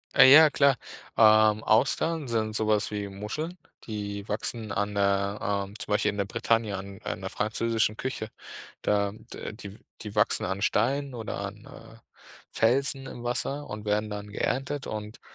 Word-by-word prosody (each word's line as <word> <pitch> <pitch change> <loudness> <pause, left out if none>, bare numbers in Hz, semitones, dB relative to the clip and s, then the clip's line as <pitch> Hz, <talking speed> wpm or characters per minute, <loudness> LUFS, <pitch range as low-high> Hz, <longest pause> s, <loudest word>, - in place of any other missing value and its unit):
Äh, 130 0 +9
ja, 155 +1 +9
klar. 140 -2 +3 0.4
Ähm, 110 -1 +6
Austern 140 +6 +2
sind 110 -2 -1
so 110 0 0
was 105 -1 +1
wie 105 -1 -3
Muscheln, 110 - -5 0.3
die 100 -2 -5
wachsen 110 +1 -3
an 100 0 -1
der 100 0 +1 0.3
ähm, 100 - -13
zum - - -6
Beispiel 105 0 +2
in 100 - -8
der 100 - 0
Bretagne 115 0 0
an 95 0 -8
an - - -4
der - - -4
französischen 110 0 0
Küche. 130 -4 -4 0.5
Da 100 -1 +1 0.2
d - - -6
die 100 -2 -9
w - - -17 0.2
die 105 -1 -7
wachsen 105 +2 +2
an 95 +2 -3
Steinen 135 +6 +1
oder 110 -3 -5
an, - - -7
äh, - - -13 0.5
Felsen 135 +3 +1
im 120 - -8
Wasser 135 +4 -2
und 105 0 -7
werden 105 +1 0
dann 105 0 -6
geerntet. 135 +6 -2
Und 105 +1 -6
110 Hz, 170 wpm, -27 LUFS, 105-125 Hz, 0.5 s, Äh